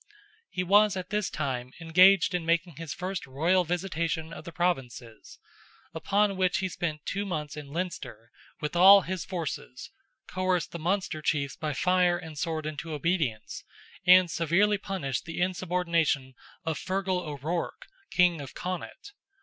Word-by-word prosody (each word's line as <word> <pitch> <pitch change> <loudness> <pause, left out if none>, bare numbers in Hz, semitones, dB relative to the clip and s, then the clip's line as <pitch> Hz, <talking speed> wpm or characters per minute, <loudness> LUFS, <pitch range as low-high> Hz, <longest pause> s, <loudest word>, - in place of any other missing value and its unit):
He 180 - -2
was 205 +2 +4
at 185 0 -6
this 210 -2 0
time 130 -4 -3
engaged 185 +5 +5
in 180 -2 -1
making 170 -1 0
his 165 -3 -6
first 185 -3 -4
royal 165 +8 +2
visitation 165 -2 -2
of - - -9
the 170 - -7
Provinces, 130 -10 -3 0.6
upon 200 +4 +1
which 185 -1 +2
he 190 0 -1
spent 155 -4 -4
two 200 +1 -2
months 155 -6 -4
in 150 -2 -8
Leinster, 140 -9 -5 0.3
with 150 +3 -3
all 195 +3 +9
his 180 -2 -4
forces, 165 - -5 0.4
coerced 185 -2 -1
the 170 - -6
Munster 175 -2 -1
chiefs 140 -2 -1
by 155 -1 -3
fire 180 +2 +2
and 160 -3 -9
sword 160 -1 -3
into 155 +1 -5
obedience, 150 -8 -2 0.4
and 180 -1 +6
severely 190 +6 +2
punished 185 -11 -3
the 165 0 -6
insubordination 170 -6 0 0.3
of 160 -3 -2
Fergal 190 -1 -1
O'Ruarc, 160 - -4 0.2
King 175 -3 +3
of 135 - -10
Connaught. 185 - -6
170 Hz, 150 wpm, -28 LUFS, 155-185 Hz, 0.6 s, all